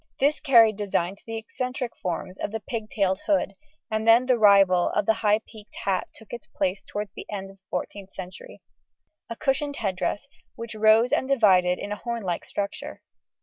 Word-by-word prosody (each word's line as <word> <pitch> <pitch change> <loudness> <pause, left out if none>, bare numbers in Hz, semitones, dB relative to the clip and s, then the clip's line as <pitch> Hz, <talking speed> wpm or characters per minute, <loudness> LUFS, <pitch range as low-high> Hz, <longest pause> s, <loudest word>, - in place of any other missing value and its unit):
This 290 +2 +2
carried 230 -7 +5
design 195 -3 -1
to - - -27
the 225 0 -4
eccentric 250 +2 -4
forms 185 +1 -4
of - - -3
the 225 - -3
pig 220 0 -5
tailed 195 -7 0
hood, 290 -10 +1 0.4
and 220 +1 -1
then 230 +2 +6
the 250 -2 +2
rival 195 -4 +5
of 210 - +1
the 220 - +4
high 210 0 +3
peaked 215 -2 -15
hat 190 -2 0
took 220 - -15
its 240 - -7
place 190 0 -2
towards 205 0 -5
the - - -10
end 195 -1 -5
of 195 - -19
the 190 - -45
14th 195 +1 -7
century 185 -1 -10 0.7
a 230 - -4
cushioned 285 +1 -1
head 195 -8 -2
dress, 205 - -2 0.3
which 230 -1 -7
rose 220 +3 +4
and 260 - +1
divided 190 -9 +4
in 205 - -6
a 210 - -2
hornlike 225 -8 -3
structure. 200 0 -5
215 Hz, 190 wpm, -25 LUFS, 195-235 Hz, 0.7 s, then